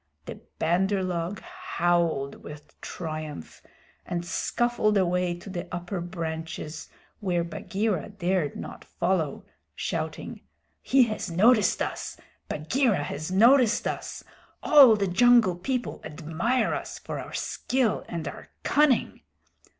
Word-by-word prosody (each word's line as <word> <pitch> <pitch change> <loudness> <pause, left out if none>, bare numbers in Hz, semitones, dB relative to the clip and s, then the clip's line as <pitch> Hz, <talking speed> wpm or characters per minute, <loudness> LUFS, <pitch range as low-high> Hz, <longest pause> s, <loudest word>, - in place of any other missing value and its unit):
The - - -8 0.2
Bandar 190 +4 +1
log 180 +2 -3
howled 175 - -1
with 150 0 -11
triumph 155 - -6 0.4
and 175 0 -4
scuffled 225 +2 +1
away 180 -1 +1
to 175 - -13
the 185 -2 -5
upper 175 +1 -4
branches 160 -2 -5 0.3
where 180 -4 0
Bagheera 190 +3 -2
dared 185 -6 -1
not - - -8
follow, 175 -5 -1 0.3
shouting: - - -4 0.4
"He 270 -1 +5
has 215 -4 -3
noticed 210 +5 +4
us! - - -5 0.3
Bagheera 210 - +1
has 150 +2 -5
noticed 235 +4 +5
us. - - -5 0.4
All 275 -7 +8
the 200 -1 0
Jungle 230 0 +5
People 250 +7 -3
admire 165 - -1
us - - -5
for - - -6
our - - -8
skill 250 -5 0
and 170 -2 -4
our - - -8 0.2
cunning." 290 -4 +2
180 Hz, 120 wpm, -27 LUFS, 165-225 Hz, 0.4 s, All